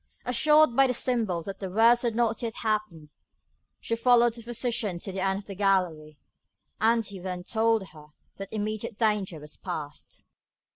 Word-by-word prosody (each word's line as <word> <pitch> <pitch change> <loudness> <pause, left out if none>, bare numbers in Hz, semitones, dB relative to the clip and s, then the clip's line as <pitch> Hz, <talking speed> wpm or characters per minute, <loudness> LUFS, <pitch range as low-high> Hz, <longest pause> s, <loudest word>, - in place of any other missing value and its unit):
Assured 300 +1 +4
by 270 +1 +5
the 250 - -1
symbol 220 -10 -1
that 195 +1 -7
the 190 - -5
worst 230 +5 +4
had 235 -3 -1
not 230 -1 0
yet 230 -2 -4
happened, 210 -8 -2 0.7
she 230 - -2
followed 240 0 +4
the 235 - -9
physician 235 -4 -2
to 195 - -6
the 190 0 -4
end 190 0 +1
of 200 - -9
the 200 - -7
gallery, 180 -6 0 0.6
and 225 0 +3
he 200 -1 -9
then 180 -1 -5
told 220 -1 +1
her 150 -2 -15 0.3
that 195 -1 -7
immediate 215 +1 -4
danger 210 -7 0
was 150 0 -10
past. 155 -5 -8
215 Hz, 175 wpm, -27 LUFS, 185-235 Hz, 0.7 s, by